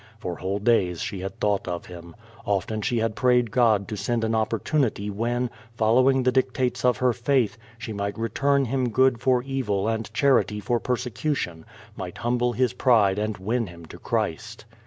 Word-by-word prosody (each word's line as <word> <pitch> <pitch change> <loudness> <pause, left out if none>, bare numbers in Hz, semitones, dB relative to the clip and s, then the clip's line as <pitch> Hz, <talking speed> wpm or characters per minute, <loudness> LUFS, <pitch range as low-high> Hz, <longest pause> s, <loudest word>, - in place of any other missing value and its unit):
For 90 -6 -5
whole 95 +2 -2
days 100 -6 +2
she 110 -5 -4
had 95 +1 -6
thought 100 -2 0
of 90 -1 -4
him. 85 -2 -11 0.3
Often 100 +1 -1
had 105 - -3
she 115 -2 +1
prayed 125 0 +2
God 110 -4 +3
to 110 - -4
send 115 +3 -1
an 110 0 0
opportunity 110 0 0
when, 120 +4 -1 0.2
following 130 +4 +3
the 130 - +3
dictates 130 -1 0
of 125 -1 +3
her 125 -1 +2
faith, 125 -1 +1 0.2
she 115 -1 -6
might 100 +1 -3
return 140 +5 +1
him 130 0 0
good 130 +1 +3
for 125 -1 +2
evil 120 -7 -1
and 110 -1 -2
charity 120 -4 +2
for 120 +3 0
persecution, 125 - -3 0.3
might 90 -2 -7
humble 120 +2 0
his 125 +2 +1
pride 105 -6 +3
and 105 0 -2
win 110 +4 -1
him 85 -1 -12
to - - -12
Christ. 105 +7 -3
115 Hz, 180 wpm, -25 LUFS, 100-125 Hz, 0.3 s, God